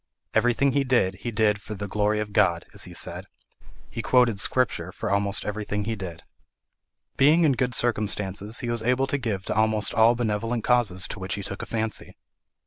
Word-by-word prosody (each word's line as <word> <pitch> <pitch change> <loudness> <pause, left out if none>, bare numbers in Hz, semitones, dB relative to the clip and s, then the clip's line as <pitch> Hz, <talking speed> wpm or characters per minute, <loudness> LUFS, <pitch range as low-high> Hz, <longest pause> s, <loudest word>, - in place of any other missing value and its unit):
Everything 120 +3 +3
he 140 +1 +1
did, 120 -8 +2
he 120 - -4
did 105 -2 +1
for 105 - -7
the 100 +1 -5
"glory 105 +2 0
of 105 -1 -4
God," 85 -4 +2
as - - -4
he - - -11
said: - - -2 0.6
he 115 - -5
quoted 120 -2 +3
Scripture 95 -7 0
for 105 +1 -4
almost 100 0 0
everything 105 0 -3
he 110 +2 -2
did. 90 -5 -8 0.9
Being 155 +5 +5
in 155 - +5
good 125 -2 0
circumstances, 105 -2 -1
he 120 - -3
was 120 -1 -1
able 125 +3 +2
to 140 +1 -1
give 105 -7 -3
to - - -2
almost 110 -1 +2
all 115 +2 +5
benevolent 115 0 -1
causes 110 -7 +2
to - - -6
which 95 +2 -2
he 100 - -5
took 95 0 -5
a - - -7
fancy. 110 -1 -3
110 Hz, 195 wpm, -25 LUFS, 100-120 Hz, 0.9 s, Being